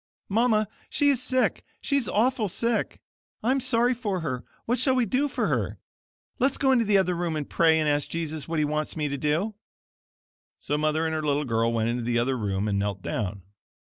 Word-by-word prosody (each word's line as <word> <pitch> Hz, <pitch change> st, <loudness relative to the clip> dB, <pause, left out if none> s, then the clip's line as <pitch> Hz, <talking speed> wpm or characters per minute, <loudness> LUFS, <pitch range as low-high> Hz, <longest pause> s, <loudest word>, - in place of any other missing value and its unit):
"Mama, 215 Hz, 0 st, +2 dB, 0.2 s
she 290 Hz, -, +3 dB
is 260 Hz, -3 st, 0 dB
sick; 255 Hz, 0 st, 0 dB, 0.2 s
she 280 Hz, -, -1 dB
is 270 Hz, -6 st, +1 dB
awful 230 Hz, -1 st, +1 dB
sick. 230 Hz, +6 st, -1 dB, 0.4 s
I'm 260 Hz, +4 st, +2 dB
sorry 245 Hz, -1 st, +2 dB
for 205 Hz, -7 st, -2 dB
her. 130 Hz, -6 st, -3 dB, 0.2 s
What 245 Hz, +1 st, 0 dB
shall 260 Hz, +1 st, +3 dB
we 250 Hz, -2 st, +2 dB
do 260 Hz, +7 st, +1 dB
for -, -, -1 dB
her? -, -, -1 dB, 0.6 s
Let's 270 Hz, +1 st, +2 dB
go 270 Hz, -1 st, +3 dB
into 240 Hz, -3 st, +3 dB
the 205 Hz, -1 st, +4 dB
other 185 Hz, -2 st, +2 dB
room 170 Hz, -2 st, -2 dB
and 150 Hz, -2 st, -3 dB
pray 160 Hz, -1 st, +3 dB
and 155 Hz, -, +1 dB
ask 145 Hz, -1 st, +1 dB
Jesus 160 Hz, -3 st, -4 dB
what 165 Hz, 0 st, -2 dB
he 155 Hz, -, +2 dB
wants 150 Hz, +2 st, -2 dB
me 150 Hz, -1 st, -1 dB
to 140 Hz, -, -3 dB
do." 165 Hz, +9 st, 0 dB, 1.1 s
So 145 Hz, -, -2 dB
Mother 155 Hz, +1 st, +1 dB
and 160 Hz, -, -1 dB
her 155 Hz, -, -1 dB
little 150 Hz, -1 st, 0 dB
girl 115 Hz, -1 st, +1 dB
went 115 Hz, -1 st, 0 dB
into 120 Hz, +1 st, -1 dB
the 120 Hz, 0 st, 0 dB
other 125 Hz, +3 st, +1 dB
room 100 Hz, -3 st, -1 dB
and 100 Hz, -1 st, 0 dB
knelt 100 Hz, -1 st, -2 dB
down. 100 Hz, -2 st, -3 dB
160 Hz, 215 wpm, -26 LUFS, 140-235 Hz, 1.1 s, the